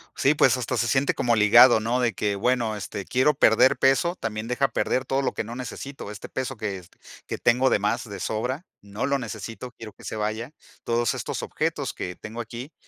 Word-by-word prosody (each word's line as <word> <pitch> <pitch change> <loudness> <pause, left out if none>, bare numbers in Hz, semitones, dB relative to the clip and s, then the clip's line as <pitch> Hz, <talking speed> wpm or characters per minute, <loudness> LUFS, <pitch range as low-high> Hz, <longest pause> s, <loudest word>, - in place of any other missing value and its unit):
Sí, 140 +3 +3
pues, 130 -3 +4
hasta 125 +1 -2
se 115 - +1
siente 135 +1 +2
como 120 -1 +2
ligado, 115 +3 +7
¿no?, 120 +3 0
de 115 -3 +1
que, 100 +1 -1
bueno, 115 0 0
este, 100 -1 -6
quiero 130 +4 +3
perder 110 +4 +4
peso, 135 +7 +3
también 110 0 -4
deja 130 +3 +1
perder 130 +2 -1
todo 135 +1 0
lo - - -1
que - - -3
no 120 +2 -7
necesito, 130 -2 -7
este 105 - -8
peso 130 -1 -4
que 105 -2 -3
es 90 -2 -14 0.4
que - - -3
tengo 125 +2 +3
de - - +2
más 115 +4 -1
de 100 -2 -7
sobra, 125 - -3 0.2
no 100 +4 -4
lo 140 -1 +1
necesito, 115 +2 -7
quiero 110 -3 -11
que - - -18
se 110 - -5
vaya. 110 +5 -3 0.3
Todos 120 -1 +1
estos - - -4
objetos - - -2
que 90 0 -5
tengo 110 +5 -7
aquí, 120 +6 -8
120 Hz, 215 wpm, -25 LUFS, 110-130 Hz, 0.4 s, ligado